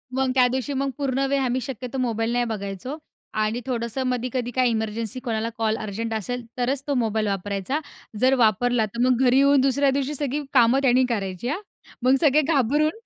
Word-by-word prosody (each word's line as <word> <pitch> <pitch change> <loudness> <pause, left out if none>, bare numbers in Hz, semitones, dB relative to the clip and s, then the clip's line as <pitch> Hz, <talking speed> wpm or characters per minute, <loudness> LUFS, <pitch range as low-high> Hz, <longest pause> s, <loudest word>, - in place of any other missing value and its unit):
मग 265 -1 +1
त्यादिवशी 260 +2 +2
मग 275 +1 -1
पूर्ण 275 -1 0
वेळ, 280 0 +2
आम्ही 255 +1 0
शक्यतो 255 0 -6
मोबाईल 230 -2 -1
नाही 245 0 +1
बघायचो. 210 +5 -5 0.4
आणि 215 +2 -1
थोडंसं 240 0 -2
मधी-कधी 250 0 -2
काय 255 -1 +3
इमर्जन्सी, 220 +1 -2
कोणाला 230 -3 -2
कॉल 220 -1 0
अर्जंट 225 +2 -4
असेल, 235 +3 -3
तरच 255 +2 0
तो 285 - +1
मोबाईल 220 -1 0
वापरायचा. 200 +6 -2 0.4
जर 260 +3 +4
वापरला, 230 +2 +2
तर 215 +3 -8
मग 255 -1 +3
घरी 250 +1 +4
येऊन 280 0 +5
दुसऱ्या 275 +1 +3
दिवशी 280 +2 -2
सगळी 290 +1 -2
कामं 245 0 +5
त्यानी 255 -1 +4
करायची 195 -2 -3
हां. 310 +7 -2 0.4
मग 255 +1 +5
सगळे 300 -1 +5
घाबरून 295 0 +2
245 Hz, 180 wpm, -24 LUFS, 225-270 Hz, 0.4 s, येऊन